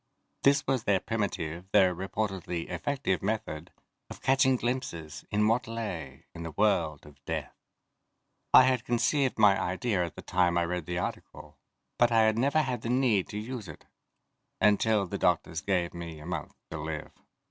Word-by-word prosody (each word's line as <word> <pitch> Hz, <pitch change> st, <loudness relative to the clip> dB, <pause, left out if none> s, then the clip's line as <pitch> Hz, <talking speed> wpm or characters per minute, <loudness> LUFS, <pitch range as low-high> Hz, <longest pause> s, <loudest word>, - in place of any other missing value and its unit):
This 140 Hz, +1 st, +4 dB
was 130 Hz, -3 st, 0 dB
their 100 Hz, -2 st, +3 dB
primitive, 95 Hz, -6 st, -3 dB
though 95 Hz, -3 st, +5 dB
reportedly 95 Hz, -2 st, -3 dB
effective 95 Hz, +1 st, -1 dB
method 95 Hz, -7 st, -3 dB, 0.4 s
of -, -, -9 dB
catching 130 Hz, 0 st, +3 dB
glimpses 120 Hz, -, -4 dB
of 105 Hz, 0 st, +2 dB
what 115 Hz, +1 st, +1 dB
lay 90 Hz, -12 st, -5 dB
in 85 Hz, -, -8 dB
the 80 Hz, -, -5 dB
world 80 Hz, -5 st, +1 dB
of 70 Hz, -1 st, -17 dB
death. -, -, -4 dB, 1.0 s
I -, -, +9 dB
had 130 Hz, -2 st, +2 dB
conceived 125 Hz, +3 st, +1 dB
my 105 Hz, -3 st, +5 dB
idea 95 Hz, +1 st, 0 dB
at 85 Hz, -3 st, -5 dB
the -, -, -9 dB
time 90 Hz, -1 st, +2 dB
I 85 Hz, -, +2 dB
read 90 Hz, -1 st, -3 dB
the 90 Hz, 0 st, -2 dB
article, 90 Hz, -, -6 dB, 0.4 s
but 120 Hz, 0 st, +5 dB
I 115 Hz, -1 st, +5 dB
had 110 Hz, 0 st, +3 dB
never 140 Hz, +5 st, +3 dB
had 125 Hz, -4 st, -3 dB
the 115 Hz, -, -4 dB
need 120 Hz, -7 st, +2 dB
to 105 Hz, -, -5 dB
use 110 Hz, -1 st, -5 dB
it 80 Hz, -, -11 dB, 0.7 s
until 105 Hz, 0 st, +3 dB
the 90 Hz, -, -5 dB
doctors 80 Hz, -, +1 dB
gave 90 Hz, -3 st, 0 dB
me 85 Hz, -2 st, -7 dB
a 75 Hz, -, -11 dB
month 85 Hz, -4 st, -5 dB, 0.2 s
to 80 Hz, -, -5 dB
live. 75 Hz, 0 st, -5 dB
100 Hz, 170 wpm, -29 LUFS, 85-120 Hz, 1.0 s, I